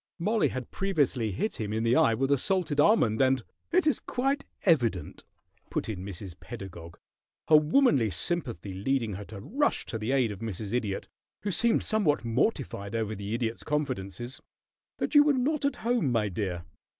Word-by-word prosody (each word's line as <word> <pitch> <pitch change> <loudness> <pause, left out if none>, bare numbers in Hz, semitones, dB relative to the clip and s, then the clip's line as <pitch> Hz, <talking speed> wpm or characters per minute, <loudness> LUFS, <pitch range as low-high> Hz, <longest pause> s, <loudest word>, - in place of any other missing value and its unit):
Mollie 210 +5 +2
had 130 -2 -5
previously 145 - 0
hit 110 - -2
him 105 -1 -3
in 110 +1 -1
the 115 +1 +3
eye 115 - +4
with 135 +4 0
a 140 - +5
salted 175 -3 0
almond, 135 - +4
and 130 -2 +3
" - - -49
"It 360 0 +3
is 305 - +2
quite 275 +3 -1 0.2
evident," 120 - +1 0.5
put - - -2
in 95 -4 -4
Mrs. 95 -1 -7
Pedagog, 90 -7 -9 0.5
her 155 - +8
womanly 150 - +4
sympathy 115 - -3
leading 115 +3 -1
her 100 +2 -6
to 105 -1 -9
rush 280 - 0
to 115 - -5
the 110 +4 -2
aid 130 -5 +2
of 100 - -7
Mrs. 110 -1 -5
Idiot, 105 -5 -2 0.4
who 205 - -1
seemed 230 +5 +2
somewhat 180 - +1
mortified 115 - -1
over 110 -1 -1
the 100 +1 -4
Idiot's 115 -1 -2
confidences, 125 - -3 0.6
"that - - -2
you 295 - +9
were 295 0 +4
not 280 +3 0
at 280 - +1
home, 235 - +2
my 110 -3 +1
dear. 90 -3 -3
125 Hz, 180 wpm, -28 LUFS, -, 0.6 s, you